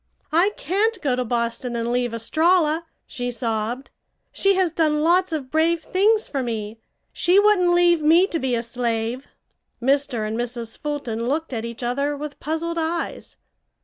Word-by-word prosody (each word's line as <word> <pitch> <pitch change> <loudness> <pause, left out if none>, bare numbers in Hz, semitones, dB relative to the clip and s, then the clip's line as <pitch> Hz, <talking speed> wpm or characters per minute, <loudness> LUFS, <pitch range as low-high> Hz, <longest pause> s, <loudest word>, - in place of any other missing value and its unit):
"I 340 +6 +4
can't 410 +8 0
go 265 -4 +2
to 250 - -1
Boston 235 +1 -2
and 235 0 -1
leave 245 -1 0
Estralla!" 320 +7 +2 0.2
she 245 -1 -4
sobbed. 235 +2 -3 0.4
"She 395 0 +2
has 370 -3 +2
done 305 -2 +1
lots 360 +2 +3
of 280 -5 -4
brave 325 +1 +2
things 420 +3 +2
for 275 - -2
me. 225 -2 -4 0.3
She 360 +3 +4
wouldn't 380 -4 +4
leave 345 -2 +4
me 330 +5 +5
to 340 -4 -3
be 255 -3 0
a 230 - -2
slave." 235 +1 -2 0.5
Mr. 255 -3 +1
and 215 - -3
Mrs. 235 -1 -4
Fulton 245 -6 -4
looked 305 +2 -2
at 225 -1 -3
each 235 +1 -7
other 280 +4 -1
with 295 0 -7
puzzled 335 +2 -2
eyes. 330 +1 -3
285 Hz, 165 wpm, -23 LUFS, 240-335 Hz, 0.5 s, me